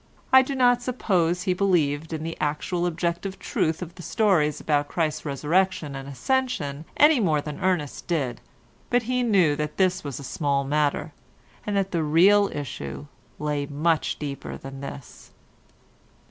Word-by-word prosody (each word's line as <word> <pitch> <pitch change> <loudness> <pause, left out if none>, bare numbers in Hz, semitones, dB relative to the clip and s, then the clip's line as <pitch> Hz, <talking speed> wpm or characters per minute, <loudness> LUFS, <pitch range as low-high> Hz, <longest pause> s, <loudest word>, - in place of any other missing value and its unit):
I 260 - +10
do 270 +1 -3
not 245 -1 +4
suppose 180 -8 0
he 185 -2 +1
believed 160 -5 +1
in 160 -1 -4
the 165 0 -4
actual 165 +4 -1
objective 175 +3 -2
truth 160 +3 -1
of 170 -1 -9
the 180 - -11
stories 165 -8 +2
about 145 -1 +1
Christ's 155 -2 -2
Resurrection 155 +1 0
and 135 0 -7
Ascension 160 - -1
any 295 -2 +6
more 160 -8 +2
than 150 0 -6
Ernest 175 -6 -1
did, 135 -9 -1 0.5
but 245 0 +2
he 250 +2 0
knew 190 -11 +3
that 150 0 -3
this 185 -1 +2
was 140 -3 -5
a - - -8
small 140 0 0
matter, 145 +1 0 0.5
and 205 -1 0
that 195 -1 0
the 170 - 0
real 190 +7 +5
issue 70 - -6 0.3
lay 145 -1 -2
much 155 +3 0
deeper 140 -2 -6
than 135 0 -9
this. 140 -1 -9
160 Hz, 160 wpm, -25 LUFS, 145-190 Hz, 0.5 s, I